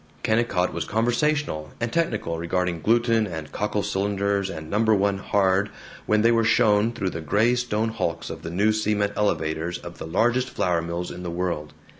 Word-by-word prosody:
Kennicott 110 -5 +1
was 85 -1 -3
conversational 120 - 0
and 115 0 -2
technical 110 - -1
regarding 85 0 -1
gluten 115 0 +2
and 80 -4 -6
cockle 105 0 -1
cylinders 100 -1 0
and 80 -4 -7
No. 105 +1 +2
I 100 - +3
Hard, 95 0 +1 0.4
when 110 0 +3
they 115 - +5
were 115 -1 +3
shown 110 -1 +3
through 100 -6 -2
the 80 - -5
gray 105 +10 +2
stone 115 -3 0
hulks 85 -6 -3
and 80 0 -8
new 100 +6 +1
cement 105 -1 0
elevators 85 -4 -1
of 85 0 -10
the - - -6
largest 120 +8 +1
flour 85 -2 0
mills 85 +1 -4
in 90 - -8
the 90 - -4
world. 85 -3 -3
100 Hz, 175 wpm, -24 LUFS, 85-110 Hz, 0.4 s, they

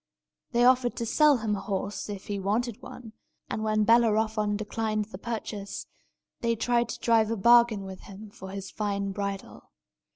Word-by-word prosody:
They 240 0 +3
offered 250 -1 +4
to 235 - -3
sell 295 +4 +4
him 220 -2 -1
a - - -4
horse, 195 +1 -4
if 200 -2 -6
he 205 -1 -3
wanted 215 +4 -1
one; 225 -3 -10 0.4
and 215 - -2
when 215 0 +2
Bellerophon 220 -2 +3
declined 215 0 -2
the 195 -3 -10
purchase, 210 -3 -5 0.5
they 230 -1 0
tried 240 +1 +1
to - - -5
drive 225 -2 +3
a 230 - -1
bargain 235 0 +5
with 190 -1 -8
him 200 +1 -11
for 190 -1 -10
his 195 0 -7
fine 200 -2 -2
bridle. 200 0 -5
215 Hz, 170 wpm, -27 LUFS, 200-235 Hz, 0.5 s, bargain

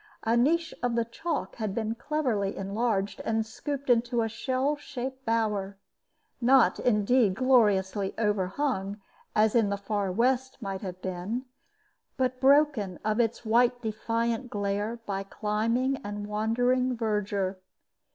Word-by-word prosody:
A 225 +1 +2
niche 325 +8 +2
of 245 -1 0
the 235 -1 +1
chalk 310 +7 -4
had 215 -4 -3
been 220 -1 -1
cleverly 235 -7 -1
enlarged 200 0 -1
and 225 0 0
scooped 280 +5 -5
into 240 -1 +2
a - - 0
shell 260 +5 -1
shaped 265 -2 -6
bower, 210 -4 0 0.6
not, 255 +1 +5
indeed, 215 -2 +3
gloriously 205 -6 +2
overhung, 205 0 -1 0.4
as 215 0 +4
in 225 -4 +3
the 200 - -1
far 200 -1 -2
West 255 +5 +1
might 195 -4 -4
have 185 -2 -7
been, 190 +8 -3 0.7
but 255 -1 -1
broken 270 - +4
of 215 +1 +1
its 230 0 0
white 240 +2 +3
defiant 230 +2 -1
glare 205 +2 -2
by 195 -1 -2
climbing 225 +6 0
and 205 -1 -6
wandering 245 +4 +1
verdure. 205 -4 -1
225 Hz, 130 wpm, -28 LUFS, 205-250 Hz, 0.7 s, not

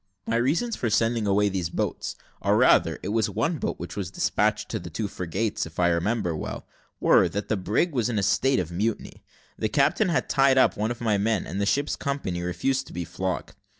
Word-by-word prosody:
"My 115 - 0
reasons 165 - +1
for 120 - -1
sending 115 0 +1
away 100 +1 +3
these 95 -4 -2
boats, - - -3 0.3
or - - +2
rather - - +4
it 95 - -3
was 110 0 +1
one 115 - -1
boat - - -2
which 85 - -7
was 100 -4 -3
despatched 95 - 0
to - - -2
the - - -8
two 105 - -3
frigates, 95 +2 -2
if 80 - -11
I 85 -1 +4
remember 85 +1 0
well, - - -5 0.3
were, - - +5
that 100 +1 -4
the 110 - +2
brig 105 - 0
was 125 -4 0
in 115 - -1
a 100 - +1
state 130 +7 +2
of 85 -2 -3
mutiny. 105 +6 -3 0.4
The 110 - 0
captain 150 - +2
had 165 - 0
tied 135 -1 +4
up 130 - +4
one 105 +2 -1
of 120 - -3
the 110 -4 +1
men, 110 -1 0
and 95 +3 -4
the 100 - +1
ship's 145 +6 +1
company 140 -11 -3
refused 110 +10 -1
to - - -12
be 85 0 -4
flogged. 90 +2 -4
105 Hz, 220 wpm, -26 LUFS, 95-125 Hz, 0.4 s, were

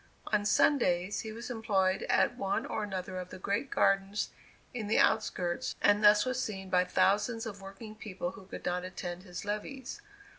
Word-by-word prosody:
On 205 -1 +3
Sundays, 195 -7 +3
he 220 - -5
was 230 +3 -6
employed 200 -5 +1
at - - +3
one 195 0 -1
or - - -3
another 185 -2 -4
of 180 0 -7
the - - -8
great 200 +8 -1
gardens 195 +1 +1 0.4
in 225 -4 -4
the 220 - +2
outskirts, 175 -5 +1
and 205 +1 +4
thus 210 0 +7
was 255 0 -1
seen 190 -3 -5
by 180 0 +4
thousands 215 +5 +2
of 200 -3 -7
working 195 +3 -9
people 195 -4 -5
who 190 0 -13
could - - -8
not 180 0 0
attend 180 -1 -5
his 180 0 -8
levees. 260 - -5
200 Hz, 180 wpm, -31 LUFS, 185-220 Hz, 0.4 s, thus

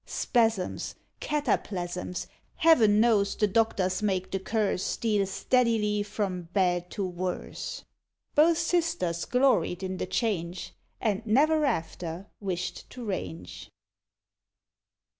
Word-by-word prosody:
Spasms! 225 -6 0 0.2
Cataplasms! 180 -12 -2 0.3
Heaven 225 -11 +5
knows, 215 -3 +3
the 210 - +2
doctors 195 -3 +1
make 190 -3 -1
the 195 - -1
curse 205 -1 0
Steal 210 -4 0
steadily 210 0 +1
from 195 -4 -3
bad 180 -2 +1
to 200 - -3
worse. 180 0 -4 0.5
Both 320 +2 +5
sisters 325 - 0
gloried 250 -9 +2
in 185 0 -3
the - - -3
change, 180 -6 -2 0.3
And 210 -1 0
never 300 +7 +4
after 170 - -3
wished 185 -3 -4
to 245 -2 -8
range. 90 - -5
200 Hz, 105 wpm, -28 LUFS, 180-230 Hz, 0.5 s, Heaven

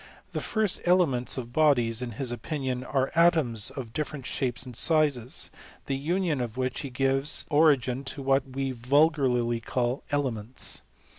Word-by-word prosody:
The - - -3
first 215 -4 0
elements 165 -10 +2
of 120 -2 -6
bodies, 125 -7 +3
in 120 -2 -4
his 125 +2 -3
opinion, 130 -1 -3
are 135 0 -1
atoms, 160 -10 +3
of 120 -5 -8
different 150 -2 -4
shapes 130 -1 -2
and 125 -2 -9
sizes; 145 -5 +1 0.3
the 135 - -1
union 160 0 -1
of 120 -1 -5
which 130 +1 -3
gives 135 +3 0
origin 140 -4 +3
to 135 +1 -4
what 135 0 +1
we 135 +1 -2
vulgarly 125 -2 +2
call 120 +3 -2
elements. 130 -5 -1
135 Hz, 145 wpm, -27 LUFS, 125-150 Hz, 0.3 s, bodies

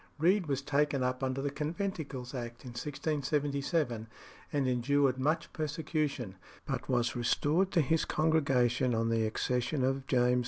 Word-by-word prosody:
Read 180 +3 +3
was 140 -1 -1
taken 145 -1 +1
up 125 +1 -1
under 130 +1 -1
the 145 - -1
Conventicles 150 -4 -4
Act 120 -2 -6
in 125 - -7
1677, 140 -2 -1 0.4
and 140 -3 +1
endured 130 +1 +2
much 155 +5 0
persecution, 150 - -2 0.3
but - - -3
was 120 -2 +1
restored 150 +9 +2
to 175 - +4
his 160 +3 +2
congregation 130 -6 +2
on 115 0 +1
the 115 -1 +2
accession 125 +4 0
of 135 +1 0
James 125 -2 +3
II. 125 0 +3
135 Hz, 150 wpm, -32 LUFS, 125-150 Hz, 0.4 s, to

